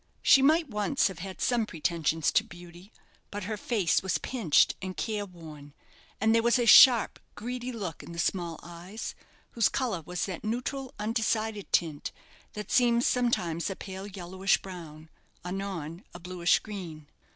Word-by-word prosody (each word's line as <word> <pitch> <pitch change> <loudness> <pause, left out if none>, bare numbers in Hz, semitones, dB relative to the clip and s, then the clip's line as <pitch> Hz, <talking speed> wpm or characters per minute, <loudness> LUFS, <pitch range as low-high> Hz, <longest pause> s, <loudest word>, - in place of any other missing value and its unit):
She 270 - +7
might 315 +4 +4
once 210 +1 +1
have 185 -3 -9
had 190 +1 -7
some 235 -3 +1
pretensions 160 -2 0
to - - +3
beauty; 175 +3 -13 0.4
but 205 0 -5
her 215 +3 -3
face 205 -4 +1
was 190 -1 0
pinched 220 - +2
and 185 -2 -6
careworn, 160 -6 -6 0.4
and 220 +2 +3
there 230 - +4
was 235 +1 +3
a 240 - +1
sharp, 235 -1 +8 0.2
greedy 250 +2 -5
look 195 -9 -5
in - - -11
the 170 - -9
small 170 -1 -1
eyes, 175 +5 -7 0.4
whose 230 - +2
colour 235 -10 -2
was 180 +3 -3
that 185 -4 -6
neutral, 250 +4 -3
undecided 220 -1 -1
tint, 155 -4 0 0.4
that 210 -1 -7
seems 240 -1 +3
sometimes 180 -10 0
a 195 - -4
pale 190 +1 -8
yellowish 190 0 0
brown, 165 -4 -10 0.4
anon 180 -2 -5
a - - -7
blueish 180 0 +2
green. 175 -8 -8
195 Hz, 155 wpm, -28 LUFS, 170-225 Hz, 0.4 s, sharp